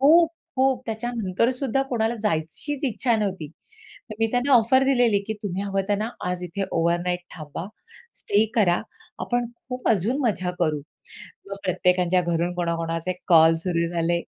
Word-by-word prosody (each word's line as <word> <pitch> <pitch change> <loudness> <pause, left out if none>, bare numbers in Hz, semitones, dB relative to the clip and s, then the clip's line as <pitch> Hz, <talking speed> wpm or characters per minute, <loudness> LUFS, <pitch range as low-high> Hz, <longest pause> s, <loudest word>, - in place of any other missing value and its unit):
खूप, 325 +4 +6 0.3
खूप 260 -1 +2
त्याच्यानंतरसुद्धा 235 +3 -1
कोणाला 230 -1 +1
जायचीच 210 - -2
इच्छा 240 -1 +1
नव्हती. 185 -8 -3 0.7
मी 225 - +4
त्यांना 250 +3 +1
ऑफर 255 +2 +5
दिलेली 245 -6 +3
की 220 - -2
तुम्ही 195 -1 -3
हवं 195 -1 -1
त्यांना 210 +2 0 0.2
आज 180 0 -3
इथे 185 +3 -3
ओव्हरनाइट 175 +2 0 0.2
थांबा, 155 +2 -6 0.5
स्टे 205 +2 +2
करा, 185 -7 +3 0.4
आपण 245 0 0 0.2
खूप 250 -1 -3
अजून 225 +6 +1
मजा 185 -5 0
करू. 155 -3 +1 0.7
मग 195 - -4
प्रत्येकाच्या 180 0 +2
घरून 170 +1 -1
कोणा-कोणाचे 165 0 -2
कॉल 165 -2 +6
सुरू 170 -2 +1
झाले. 170 0 0
195 Hz, 140 wpm, -24 LUFS, 175-240 Hz, 0.7 s, खूप